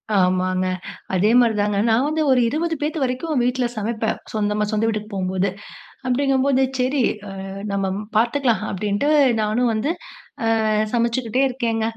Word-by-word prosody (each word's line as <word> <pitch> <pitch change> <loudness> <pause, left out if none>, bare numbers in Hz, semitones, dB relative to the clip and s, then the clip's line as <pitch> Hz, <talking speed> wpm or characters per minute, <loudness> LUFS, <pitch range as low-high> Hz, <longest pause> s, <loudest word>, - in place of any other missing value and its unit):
ஆமாங்க. 185 0 +2 0.5
அதே 195 +4 +3
மாரிதாங்க, 210 -4 +2
நான் 230 +4 +3
வந்து 310 +1 0
ஒரு 255 - +4
20 325 +5 -1
பேத்து 310 +2 -1
வரைக்கும் 260 +2 -1
வீட்டுல 250 0 +1
சமைப்பேன் 220 +1 -2
சொந்தமா, 210 -1 0
சொந்த 215 +1 +1
வீட்டுக்கு 215 -1 -2
போகும்போது. 190 0 0 0.6
அப்படிங்கும்போது, 270 +1 +2 0.2
சேரி 255 +2 +1 0.3
அ, - - -7 0.4
நம்ம 200 - 0 0.2
ம் 210 +1 -6
பார்த்துக்கலாம், 235 0 +2
அப்படின்ட்டு 205 +7 -1 0.3
நானும் 220 +3 +1
வந்து 220 +7 -1 0.8
அ - - +2 0.2
சமைச்சுக்கிட்டே 235 +2 +1
இருக்கேங்க. 230 -3 -1
230 Hz, 135 wpm, -21 LUFS, 210-260 Hz, 0.8 s, ஒரு